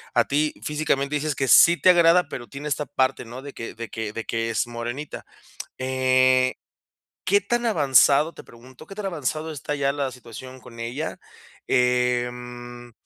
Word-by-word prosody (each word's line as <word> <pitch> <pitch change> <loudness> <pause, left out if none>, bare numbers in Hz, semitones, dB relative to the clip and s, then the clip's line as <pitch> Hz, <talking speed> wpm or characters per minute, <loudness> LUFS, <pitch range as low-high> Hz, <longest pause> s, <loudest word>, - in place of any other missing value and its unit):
A - - +4
ti 150 +2 +1
físicamente 150 -2 -1
dices 150 0 -1
que 135 - -1
sí 170 +7 +7
te 185 - +7
agrada, 170 -1 +5
pero 120 -2 -7
tiene 140 +2 -7
esta 145 +1 -1
parte, 130 -2 0
¿no?, 120 +3 -9
de 140 - -9
que 115 - -7
de 115 0 -7
que 110 -2 -5
de 115 - -5
que 115 0 -2
es 115 - 0
morenita. 120 +5 -6 0.6
Eh, 130 0 +3 0.7
¿qué 200 +2 +4
tan 240 +4 -1
avanzado?, 150 - +4
te - - -12
pregunto, 125 +2 -15
¿qué 195 - -9
tan 210 -1 -5
avanzado 155 -1 -3
está 150 0 -5
ya 140 -1 0
la 140 -2 -2
situación 125 +1 -11
con 115 -2 -13
ella? 135 +7 -4 0.5
Em, 125 -1 -1
130 Hz, 170 wpm, -24 LUFS, 120-150 Hz, 0.7 s, sí